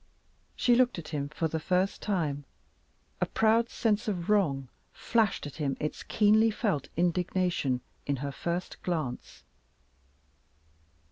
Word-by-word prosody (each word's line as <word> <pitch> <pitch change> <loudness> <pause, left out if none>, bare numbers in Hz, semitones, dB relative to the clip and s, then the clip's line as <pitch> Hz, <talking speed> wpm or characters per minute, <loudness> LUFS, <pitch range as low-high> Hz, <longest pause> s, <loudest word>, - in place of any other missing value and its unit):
She 245 - +3
looked 245 -2 +3
at 170 - -7
him 145 -2 -3
for 160 +2 -1
the 160 0 -2
first 185 +4 0
time. 155 -8 -1 0.8
A - - +2
proud 225 +1 +3
sense 220 -1 0
of 190 -2 -1
wrong 140 -11 +2 0.2
flashed 225 -8 +1
at 145 - -8
him 140 -4 -1
its 150 - -3
keenly 215 +1 +4
felt 200 - -1
indignation 175 -6 +1 0.3
in 140 - +1
her 140 - -2
first 170 +5 -4
glance. 155 -9 -4
175 Hz, 130 wpm, -29 LUFS, 150-210 Hz, 0.8 s, keenly